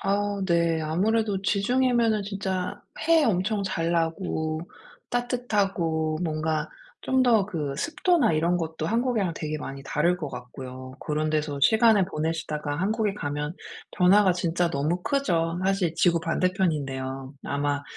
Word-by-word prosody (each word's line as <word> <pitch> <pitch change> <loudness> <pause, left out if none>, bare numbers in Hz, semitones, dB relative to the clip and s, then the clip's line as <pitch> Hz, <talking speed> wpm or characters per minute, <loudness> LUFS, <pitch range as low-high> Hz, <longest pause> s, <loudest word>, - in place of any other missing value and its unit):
아 200 +1 0
네. 170 -2 +2
아무래도 195 +6 +1
지중해면은 230 +1 +2
진짜 195 -1 -3 0.3
해 330 -2 +5
엄청 205 -1 +1
잘 170 -3 -1
나고 160 -2 -1 0.5
따뜻하고 195 -10 0
뭔가 155 -1 -1 0.3
좀 260 0 +2
더 225 -6 +4
그 155 -8 -3
습도나 330 - +2
이런 170 +3 +2
것도 160 -2 -3
한국이랑 230 -4 0
되게 155 0 -4
많이 135 -2 -7
다를 170 +6 +1
것 155 -5 -5
같고요. 130 +1 -8
그런 155 +1 -1
데서 150 -2 -1
시간을 220 - +5
보내시다가 155 -3 -3
한국에 210 +3 0
가면 150 -3 -3 0.4
변화가 185 +1 +6
진짜 175 -1 0
너무 155 +6 -1
크죠. 170 -12 0
사실 190 -4 +1
지구 170 -1 +3
반대편인데요. 140 -8 -1
아마 145 0 -1
175 Hz, 290 characters per minute, -26 LUFS, 155-205 Hz, 0.5 s, 변화가